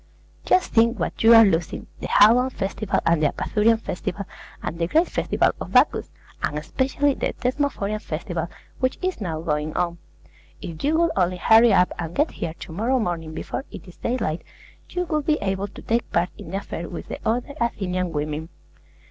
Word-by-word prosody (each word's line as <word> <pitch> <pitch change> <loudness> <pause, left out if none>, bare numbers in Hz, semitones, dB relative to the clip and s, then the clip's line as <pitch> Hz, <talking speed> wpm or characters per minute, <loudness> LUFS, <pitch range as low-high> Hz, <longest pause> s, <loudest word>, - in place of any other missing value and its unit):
Just 365 0 +2
think 230 +1 +4
what - - -3
you 230 +1 +8
are 225 0 +9
losing, 170 -3 0
the - - -4
Haloan 240 +5 +6
Festival 200 -2 -2
and 165 -2 +3
the 150 - +4
Apaturian 220 +8 +1
Festival, 200 -1 -4 0.4
and 165 - -4
the 165 - +1
Great 320 - +3
Festival - - +1
of - - -6
Bacchus, - - +4 0.3
and 150 - -1
especially 265 - 0
the - - -2
Thesmophorian 250 -6 -1
Festival, 170 +1 -4 0.3
which 255 0 0
is 370 -10 -1
now 165 -5 -3
going 150 -1 -2
on. 170 -1 -1 0.6
If 165 -2 -7
you 310 +3 +2
would 335 0 +3
only 180 -1 +1
hurry 225 +5 +6
up, 180 -2 +4
and 165 0 -4
get 300 +3 +2
here 160 - -5
to - - -10
morrow 230 +10 +1
morning 165 -8 -3
before 265 - -4
it - - -10
is 180 - -14
daylight, 225 -10 -2 0.5
you 360 0 -2
would 305 -3 -2
be 305 -1 +3
able 195 0 -1
to 205 - -12
take 230 +1 -1
part 175 +1 +1
in - - -10
the 190 - -2
affair 170 -4 -6
with 175 - -7
the - - -6
other 245 +5 -1
Athenian 185 -6 -1
women. 150 +1 -3
200 Hz, 190 wpm, -23 LUFS, 170-245 Hz, 0.6 s, are